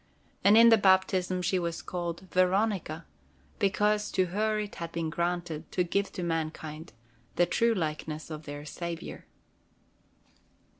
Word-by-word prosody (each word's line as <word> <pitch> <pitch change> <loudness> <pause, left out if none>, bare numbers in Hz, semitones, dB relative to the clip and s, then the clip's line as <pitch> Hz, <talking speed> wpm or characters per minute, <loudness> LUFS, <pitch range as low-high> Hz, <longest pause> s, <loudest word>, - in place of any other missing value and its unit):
And 205 +2 +7
in 230 0 +9
the 225 -1 +6
baptism 190 -1 +3
she 180 +1 +1
was 170 -1 -3
called 175 -1 -4
Veronica, 185 -3 +1 0.5
because 210 +2 +2
to 185 - +3
her 215 +1 +1
it 210 -1 -4
had 165 0 -4
been 165 -1 -2
granted 170 -2 -3
to 180 - +2
give 200 +3 -1
to 180 - -4
mankind 160 -1 -4 0.4
the 175 - +4
true 230 +5 +2
likeness 155 -2 -4
of 155 0 -7
their 145 0 -7
Saviour. 170 +2 -6
175 Hz, 140 wpm, -29 LUFS, 165-200 Hz, 0.5 s, in